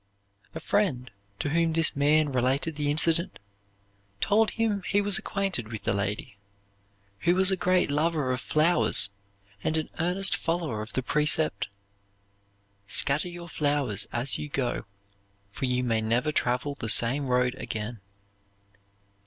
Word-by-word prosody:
A - - -4
friend 140 - -1 0.3
to 145 - -2
whom 165 +1 +1
this 165 0 +2
man 150 +1 +3
related 130 +5 0
the 145 -1 -1
incident 165 +3 +1 0.8
told 215 - +3
him 220 -3 -1
he 200 - 0
was 205 -1 +3
acquainted 195 - -1
with 110 -1 -7
the - - 0
lady, 100 +2 -3 0.8
who 175 - +2
was 190 +1 +4
a - - +3
great 180 -3 +1
lover 150 -2 0
of 125 0 -2
flowers 155 - +3 0.5
and 160 - 0
an 155 - -3
earnest 180 +3 +1
follower 165 -10 -2
of 110 - -8
the 130 - -1
precept: 150 -6 +1 1.2
"Scatter 140 - +1
your 175 0 -9
flowers 145 - -1
as 125 +3 0
you 150 - -5
go, 130 -5 -2 0.7
for 130 - -3
you 125 0 0
may 115 -2 0
never 120 +7 0
travel 125 +1 0
the 115 -5 -5
same 130 +6 +4
road 125 0 +1
again." 110 +1 -5
145 Hz, 145 wpm, -27 LUFS, 125-170 Hz, 1.2 s, was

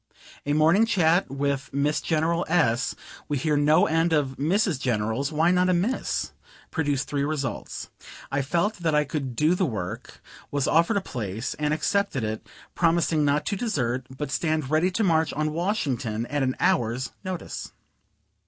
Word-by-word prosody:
A 145 - +2
morning 165 +9 +4
chat 175 -4 +3
with 140 0 -2
Miss 145 +2 0
General 165 +2 +1
S. 135 -8 +2 0.3
we 145 - -1
hear 150 +3 +1
no 150 +4 +4
end 165 +1 +2
of 140 -4 +1
Mrs. 175 +2 +1
Generals, 115 +3 -1
why 160 +3 +3
not 180 0 +3
a 180 - +3
Miss? 215 +10 -1 0.4
produced 145 -4 0
three 140 -1 -1
results: 140 -4 -4 0.4
I 140 0 +1
felt 170 +10 0
that 165 -3 0
I 150 - +4
could 140 -4 -4
do 155 +6 +3
the 180 -1 +1
work, 95 -8 -5 0.3
was 140 -2 0
offered 170 +7 +3
a - - +1
place, 115 - -4
and 150 0 0
accepted 160 - 0
it, 110 0 -4 0.3
promising 165 -2 +2
not 145 +1 +1
to 200 - -1
desert, 130 - -1
but 135 +2 -5
stand 155 -4 -1
ready 160 +4 +3
to 205 +5 -1
march 160 -4 +2
on 155 +1 -1
Washington 135 - -1
at 145 +3 -2
an 130 -1 0
hour's 130 -9 +1
notice. 185 -3 -5
150 Hz, 165 wpm, -25 LUFS, 135-170 Hz, 0.4 s, morning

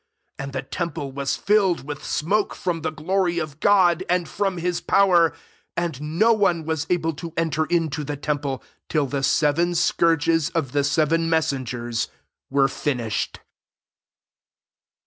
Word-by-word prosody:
8 - - -3
And 140 0 -7
the 130 -1 -3
temple 145 -1 -4
was 135 0 -2
filled 200 -6 +2
with 145 0 -6
smoke 200 +7 0
from 175 -3 -2
the 160 - -1
glory 175 +3 0
of 155 -3 -4
God, 185 -3 +4
and 180 -1 +1
from 195 -2 -1
his 175 0 -1
power; 180 -4 +4 0.5
and 170 -5 -2 0.2
no 230 +4 +5
one 175 -7 +1
was 160 -1 -2
able 165 -2 +1
to 165 +3 -7
enter 160 -1 +1
into 160 -3 0
the 145 0 -4
temple, 145 -2 -2 0.3
till 150 -3 +1
the 140 +1 -2
seven 155 +5 +2
scourges 165 -2 +2
of 140 -7 0
the 145 +1 +1
seven 160 +3 +2
messengers 130 -7 -1 0.4
were 135 0 +3
finished. 125 -6 -2
160 Hz, 145 wpm, -23 LUFS, 145-175 Hz, 0.5 s, no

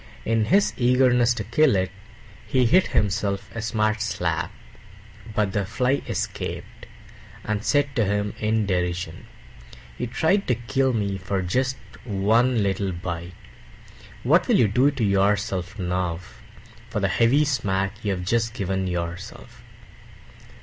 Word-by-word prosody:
In 115 -1 +2
his 200 - +3
eagerness 125 -1 +4
to 110 - -3
kill 120 +4 +3
it, 95 0 0 0.6
he 130 -2 +2
hit 180 +10 +4
himself 100 -1 -1
a 115 - -4
smart 110 -1 0
slap. 90 -6 -1 0.8
But 105 -2 +1
the 100 - +1
Fly 125 +7 0
escaped, - - -5 0.6
and 105 0 -2
said 145 0 +1
to 115 -5 +2
him 105 +1 -1
in 110 0 +1
derision, 90 -3 -2 0.7
"You - - -2
tried 160 - +1
to 125 - +2
kill 130 +3 0
me 100 -3 -1
for 95 +1 -2
just 130 +8 0 0.3
one 115 +2 +2
little 100 0 -1
bite; 85 0 -5 0.9
what - - +4
will - - +4
you 115 - +5
do 125 +7 +3
to 135 -5 -3
yourself 100 -1 +1
now, 90 -2 -1 0.7
for - - -2
the - - +1
heavy 135 +6 +3
smack 100 -6 -1
you 100 -2 0
have 90 -1 -5
just 115 +3 0
given 95 -2 -1
yourself?" 90 +7 -6
105 Hz, 140 wpm, -24 LUFS, 95-120 Hz, 0.9 s, you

